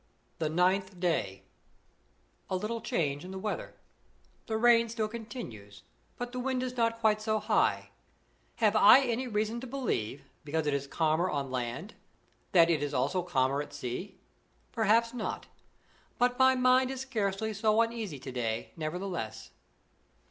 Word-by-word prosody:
THE 155 Hz, -2 st, 0 dB
NINTH 185 Hz, +3 st, +1 dB
DAY. 100 Hz, -, -1 dB, 1.1 s
A 185 Hz, -, 0 dB
LITTLE 220 Hz, +5 st, -3 dB
change 145 Hz, -10 st, -1 dB
in 180 Hz, -, -8 dB
the 190 Hz, -, -6 dB
weather. 210 Hz, +2 st, -4 dB, 0.7 s
The 220 Hz, -, -1 dB
rain 230 Hz, 0 st, +5 dB
still 220 Hz, -1 st, -1 dB
continues, 165 Hz, -, -8 dB, 0.3 s
but 245 Hz, 0 st, -4 dB
the 250 Hz, -, -4 dB
wind 255 Hz, 0 st, -1 dB
is 250 Hz, -1 st, -4 dB
not 230 Hz, -1 st, +1 dB
quite 215 Hz, -1 st, +3 dB
so 215 Hz, 0 st, 0 dB
high. 210 Hz, -, +1 dB, 0.6 s
Have -, -, +2 dB
I 270 Hz, -, +8 dB
any 250 Hz, 0 st, -1 dB
reason 220 Hz, +1 st, -1 dB
to 260 Hz, -, -7 dB
believe, 145 Hz, -, -2 dB, 0.2 s
because 155 Hz, +1 st, -1 dB
it 150 Hz, -, +1 dB
is 140 Hz, 0 st, -2 dB
calmer 160 Hz, +4 st, +1 dB
on 140 Hz, -4 st, -2 dB
land, 130 Hz, -, -4 dB, 0.6 s
that 170 Hz, -2 st, +6 dB
it 155 Hz, -3 st, +1 dB
is 145 Hz, -1 st, -2 dB
also 140 Hz, +9 st, +1 dB
calmer 140 Hz, -5 st, +1 dB
at 145 Hz, 0 st, -9 dB
sea? 145 Hz, +8 st, -5 dB, 0.5 s
Perhaps 230 Hz, +1 st, +2 dB
not. 235 Hz, -3 st, -4 dB, 0.7 s
But 245 Hz, +1 st, +1 dB
my 260 Hz, 0 st, +6 dB
mind 255 Hz, 0 st, +4 dB
is 265 Hz, -1 st, -4 dB
scarcely 220 Hz, -4 st, -2 dB
so 215 Hz, +1 st, +2 dB
uneasy 230 Hz, -8 st, -1 dB
to 130 Hz, 0 st, -8 dB
day, 115 Hz, -3 st, -3 dB
nevertheless. 165 Hz, -, -4 dB
195 Hz, 155 wpm, -30 LUFS, 145-230 Hz, 1.1 s, I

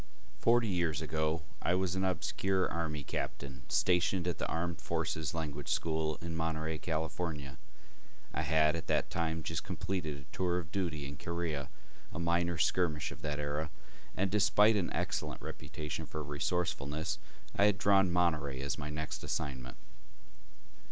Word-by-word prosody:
Forty 115 Hz, 0 st, +5 dB
years 85 Hz, -6 st, +1 dB
ago 80 Hz, 0 st, 0 dB, 0.2 s
I 90 Hz, -, +3 dB
was 95 Hz, -1 st, +1 dB
an 95 Hz, 0 st, 0 dB
obscure 95 Hz, 0 st, +1 dB
Army 80 Hz, -3 st, -2 dB
captain 70 Hz, -1 st, -4 dB
stationed 90 Hz, 0 st, +3 dB
at 90 Hz, -, -1 dB
the -, -, 0 dB
Armed 85 Hz, +1 st, -1 dB
Forces 80 Hz, -1 st, -1 dB
Language 75 Hz, -3 st, -3 dB
School 80 Hz, -1 st, +1 dB
in 85 Hz, -1 st, -3 dB
Monterey, 80 Hz, -1 st, -1 dB
California. 80 Hz, -3 st, -2 dB, 0.7 s
I 80 Hz, -, 0 dB
had 80 Hz, 0 st, +4 dB
at 85 Hz, -, -4 dB
that -, -, +1 dB
time 80 Hz, -1 st, 0 dB
just -, -, -2 dB
completed 85 Hz, -7 st, -2 dB
a 70 Hz, -, -13 dB
tour 90 Hz, -1 st, +2 dB
of 80 Hz, -3 st, -4 dB
duty 85 Hz, -7 st, -1 dB
in 70 Hz, 0 st, -7 dB
Korea, 85 Hz, -3 st, -2 dB, 0.4 s
a -, -, -6 dB
minor 85 Hz, 0 st, +2 dB
skirmish 80 Hz, -2 st, +2 dB
of -, -, -9 dB
that 75 Hz, -1 st, -1 dB
era, 75 Hz, +1 st, -1 dB, 0.5 s
and 95 Hz, 0 st, +2 dB
despite 105 Hz, +1 st, +6 dB
an 95 Hz, -4 st, +1 dB
excellent -, -, -1 dB
reputation 75 Hz, +1 st, -5 dB
for 80 Hz, -, -4 dB
resourcefulness, 75 Hz, +1 st, -1 dB, 0.4 s
I 100 Hz, -, +5 dB
had 105 Hz, -2 st, +4 dB
drawn 95 Hz, -2 st, +5 dB
Monterey 80 Hz, -6 st, +2 dB
as 70 Hz, -1 st, -2 dB
my 75 Hz, -, -3 dB
next 75 Hz, +1 st, -4 dB
assignment. 65 Hz, -3 st, -3 dB
80 Hz, 150 wpm, -34 LUFS, 75-90 Hz, 0.7 s, despite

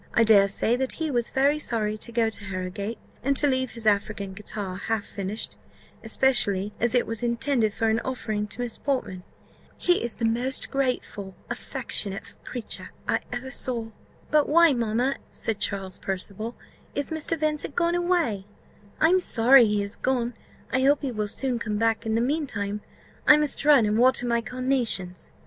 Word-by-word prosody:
I 230 Hz, -, +6 dB
dare 205 Hz, -3 st, +6 dB
say 220 Hz, +4 st, +1 dB
that 265 Hz, 0 st, -1 dB
he 320 Hz, -2 st, -2 dB
was 240 Hz, -3 st, 0 dB
very 280 Hz, +3 st, +2 dB
sorry 215 Hz, -6 st, -1 dB
to 215 Hz, +2 st, -7 dB
go 230 Hz, -1 st, +1 dB
to 205 Hz, -, -4 dB
Harrowgate, 190 Hz, +4 st, -4 dB, 0.2 s
and 275 Hz, +2 st, +1 dB
to -, -, +2 dB
leave 260 Hz, -2 st, +1 dB
his 225 Hz, -, -8 dB
African 200 Hz, -1 st, 0 dB
guitar 200 Hz, -1 st, -5 dB
half 220 Hz, +1 st, -2 dB
finished; 200 Hz, +2 st, -5 dB, 0.5 s
especially 210 Hz, -4 st, +2 dB
as 240 Hz, +1 st, +1 dB
it 245 Hz, -, +3 dB
was 225 Hz, 0 st, -4 dB
intended 235 Hz, -1 st, +1 dB
for 225 Hz, +2 st, -1 dB
an 220 Hz, +1 st, +2 dB
offering 220 Hz, -5 st, -3 dB
to 220 Hz, -, -6 dB
Miss 240 Hz, -2 st, -4 dB
Portman. 230 Hz, -10 st, -2 dB, 0.6 s
He 355 Hz, 0 st, +3 dB
is 235 Hz, -, -1 dB
the 230 Hz, -, -2 dB
most 245 Hz, +4 st, 0 dB
grateful, 250 Hz, -8 st, -2 dB, 0.2 s
affectionate 195 Hz, -1 st, -1 dB
creature 245 Hz, -3 st, -5 dB, 0.2 s
I -, -, +2 dB
ever 255 Hz, +2 st, -4 dB
saw." 235 Hz, -4 st, -3 dB, 0.4 s
"But 300 Hz, -1 st, +3 dB
why, 335 Hz, 0 st, +6 dB
mamma," 240 Hz, +3 st, 0 dB
said 220 Hz, -3 st, -3 dB
Charles 195 Hz, -2 st, -3 dB
Percival, 200 Hz, +4 st, -4 dB, 0.4 s
"is 285 Hz, +1 st, -2 dB
Mr. 320 Hz, +1 st, -2 dB
Vincent 300 Hz, -2 st, -1 dB
gone 340 Hz, 0 st, +2 dB
away? 345 Hz, -, +1 dB, 0.5 s
I 320 Hz, -, +5 dB
am 370 Hz, +1 st, +5 dB
sorry 245 Hz, -6 st, +6 dB
he 210 Hz, -1 st, +1 dB
is 200 Hz, +1 st, -6 dB
gone; 245 Hz, -2 st, -1 dB, 0.4 s
I 260 Hz, -, +3 dB
hope 285 Hz, +2 st, +3 dB
he 270 Hz, -, -1 dB
will 215 Hz, -2 st, -2 dB
soon 250 Hz, +3 st, -2 dB
come 215 Hz, -2 st, -2 dB
back. 225 Hz, +1 st, +1 dB
In 220 Hz, -, +1 dB
the 230 Hz, -, +2 dB
mean 290 Hz, +4 st, 0 dB
time, 205 Hz, -2 st, -3 dB, 0.5 s
I 300 Hz, -, +9 dB
must 300 Hz, -2 st, 0 dB
run 285 Hz, -6 st, +6 dB
and 210 Hz, +1 st, +1 dB
water 250 Hz, 0 st, +4 dB
my 235 Hz, -1 st, +1 dB
carnations." 245 Hz, -8 st, 0 dB
235 Hz, 180 wpm, -26 LUFS, 210-265 Hz, 0.6 s, I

